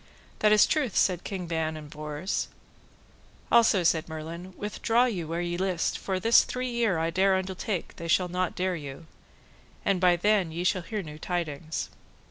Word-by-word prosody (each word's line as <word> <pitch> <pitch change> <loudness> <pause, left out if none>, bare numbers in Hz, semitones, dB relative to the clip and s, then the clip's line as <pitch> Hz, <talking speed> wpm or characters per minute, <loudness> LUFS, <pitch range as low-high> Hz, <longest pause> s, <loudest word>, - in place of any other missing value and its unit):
That 210 - +4
is 215 - +7
truth, 290 -8 0
said 180 -2 +2
King 190 -3 -4
Ban 160 -1 -2
and 150 -1 -9
Bors. 150 +4 -3 1.0
Also 225 -5 +5
said 165 -1 +2
Merlin, 165 +4 -7
withdraw 225 +3 +1
you 185 -10 -2
where 165 +2 -2
ye 175 0 -2
list, 185 -2 0
for 190 -1 -2
this 230 +5 +6
three 255 0 -3
year 230 -7 +1
I 165 +1 0
dare 190 +2 +3
undertake 190 0 -3
they 170 - -6
shall 180 +2 +3
not 180 0 -2
dere 185 0 0
you; 145 0 -8 0.8
and 195 -2 +2
by 180 -1 +5
then 195 -1 +2
ye 170 +2 -3
shall 180 0 +1
hear 205 +4 -4
new 150 -1 -9
tidings. 160 -3 -3
180 Hz, 175 wpm, -27 LUFS, 165-195 Hz, 1.0 s, is